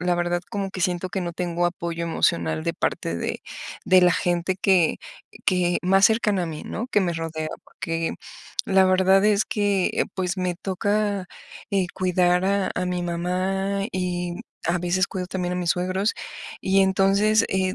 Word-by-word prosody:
la 180 0 +1
verdad, 175 0 0
como 200 -3 -3
que 190 - -6
siento 180 0 0
que 190 - -2
no 175 -1 -3
tengo 175 0 0
apoyo 170 -1 -3
emocional 80 - 0
de - - 0
parte 85 - -2
de - - -3 0.4
de 185 0 +6
la 180 -1 +6
gente 175 +2 0
que 180 -5 +3 0.5
que 180 -1 +2
más 195 +2 +5
cercana 210 -4 +1
a - - -4
mí, 155 -2 -6
¿no?, 230 - -4
que 210 - +2
me 175 -2 0
rodea, 165 -1 -4 0.2
porque 165 0 -3 0.5
la 190 -1 +4
verdad 190 +1 +4
es 210 0 +3
que, 205 -3 +1
eh, - - +1
pues 185 -1 -2
me 180 -1 -1
toca, 205 +1 -1 0.4
eh, 195 -3 +1
cuidar 180 -1 +2
a 200 0 +1
a 180 - -1
mi 180 0 -2
mamá 185 +3 -1
y 180 -1 -2 0.3
a 170 - +1
veces 180 +2 +1
cuido 185 -2 -4
también 180 -1 -2
a - - -2
mis 175 -2 0
suegros 185 +4 0 0.5
y 195 +1 +3
entonces, 195 +3 +3
eh, 190 -1 0
185 Hz, 175 wpm, -24 LUFS, 175-195 Hz, 0.5 s, de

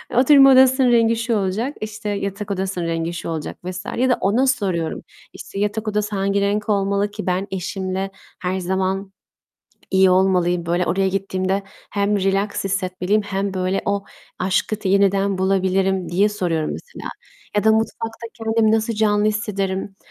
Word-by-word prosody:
"Oturma 270 +2 +7
odasının 260 -1 +5
rengi 230 -1 +4
şu 230 0 -1
olacak, 210 +7 -1
işte, 215 0 -5
yatak 200 0 -3
odasının 190 -2 -2
rengi 165 0 -2
şu 170 - -5
olacak." 160 -2 -4
vs. 185 +1 -6
ya 260 +2 +2
da 250 - +3
ona 230 +7 +2
soruyorum. 185 -10 -1 0.3
İşte, 195 - -8
"Yatak 210 +2 -1
odası 210 0 -1
hangi 200 +1 +1
renk 205 +2 0
olmalı 200 0 +1
ki 210 0 -6
ben 185 +2 0
eşimle 190 +1 -3 0.3
her 185 +1 -2
zaman 190 +1 -2 0.8
iyi 190 -1 +5
olmalıyım? 180 -2 +2
Böyle 175 +1 0
oraya 190 +2 +1
gittiğimde 190 0 -1 0.3
hem 200 0 +1
relax 195 +2 0
hissetmeliyim 195 +1 0
hem 195 -1 -3
böyle 185 +1 -1
o 200 0 -1 0.3
aşkı 190 +3 0
t 210 -3 -3
yeniden 195 0 +2
bulabilirim." 190 0 +1
diye 195 +4 +3
soruyorum 175 -7 -1
mesela. 485 - -8 0.5
Ya 205 - +2
da, 220 - +6
"Mutfakta 225 +1 -2
kendimi 225 -1 +1
nasıl 225 +1 +1
canlı 210 -1 +2
hissederim?" 200 -3 -2
195 Hz, 155 wpm, -21 LUFS, 190-215 Hz, 0.8 s, Oturma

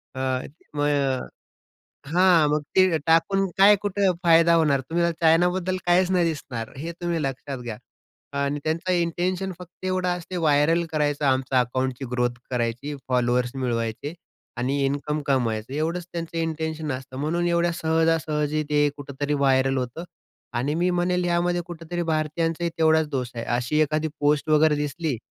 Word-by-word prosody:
अ, - - -5 0.6
मग 145 0 +2
अ, 135 -3 0 0.8
हां, 175 -2 +4
मग 150 0 +1
ते 185 -4 +5
टाकून 195 +4 +3
काय 200 +2 +8
कुठे 200 -1 +1
फायदा 170 0 +5
होणार. 150 -5 +3
तुम्हाला 170 0 +1
चायनाबद्दल 180 +3 +3
काहीच 180 +1 +3
नाही 180 -2 +3
दिसणार 130 -8 -4
हे 165 +5 -5
तुम्ही 170 -2 -1
लक्षात 135 0 -4
घ्या. 120 -3 -6 0.6
आणि 140 +1 0
त्यांचा 165 +4 -1
इंटेन्शन 180 +2 -1
फक्त 180 0 -13
एवढाच 180 -1 0
असते 180 +1 -7
व्हायरल 160 +1 +3
करायचं, 150 -1 0
आमच 130 -1 +1
अकाउंटची 130 +2 -1
ग्रोथ 125 -1 +1 0.2
करायची, 120 +4 -2
फॉलोअर्स 125 -1 +1
मिळवायचे 120 +2 -2 0.4
आणि 130 +4 -1
इन्कम 145 +2 -1
कमवायचं. 120 -4 0
एवढंच 165 +3 -2
त्यांचं 165 -1 -5
इंटेन्शन 160 -2 -2
असतं 130 0 -7
म्हणून 165 +5 0
एवढ्या 170 0 +2
सहजासहजी 160 -2 +1
ते 145 0 +3
कुठेतरी 145 +1 -3
व्हायरल 135 -1 +2
होतं 125 +7 -4 0.5
आणि 140 +5 -1
मी 180 - +2
म्हणेल 180 0 0
यामध्ये 175 0 +1
कुठेतरी 175 0 -5
भारतीयांचाही 165 +2 -1
तेवढाच 160 -1 +3
दोष 125 -4 -2
आहे. 115 -1 -4
अशी 120 +5 0
एखादी 155 +1 0
पोस्ट 150 +1 +2
वगैरे 155 0 +5
दिसली, 150 -1 -2
155 Hz, 145 wpm, -24 LUFS, 135-170 Hz, 0.8 s, काय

